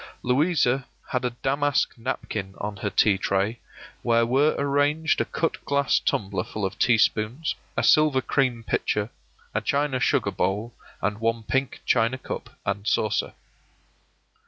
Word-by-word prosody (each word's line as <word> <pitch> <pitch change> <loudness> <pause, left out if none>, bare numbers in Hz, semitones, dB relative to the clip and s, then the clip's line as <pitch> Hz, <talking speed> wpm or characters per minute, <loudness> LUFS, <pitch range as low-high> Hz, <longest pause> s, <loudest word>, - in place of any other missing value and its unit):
Louisa 135 -1 +2 0.2
had 125 0 -1
a 125 - +1
damask 135 +3 0
napkin 100 -4 -4
on 105 0 -5
her 105 0 -2
tea 100 -1 +3
tray, 100 +5 0 0.4
where 115 0 +3
were 135 +6 +3
arranged 145 +3 +1
a - - 0
cut 165 - -2
glass 140 -1 +2
tumbler 100 -1 -1
full 105 -2 -4
of 95 - -5
teaspoons, 115 +4 +2 0.2
a - - +1
silver 155 -4 +5
cream 130 -4 0
pitcher, 105 0 -1 0.4
a - - 0
china 140 -2 0
sugar - - +1
bowl, 105 +4 -1 0.3
and 105 0 -1
one 115 0 0
pink 135 +4 -1
china 115 +3 +2
cup - - -6 0.2
and 100 +1 -2
saucer. 110 -2 0
120 Hz, 140 wpm, -25 LUFS, 105-140 Hz, 0.4 s, silver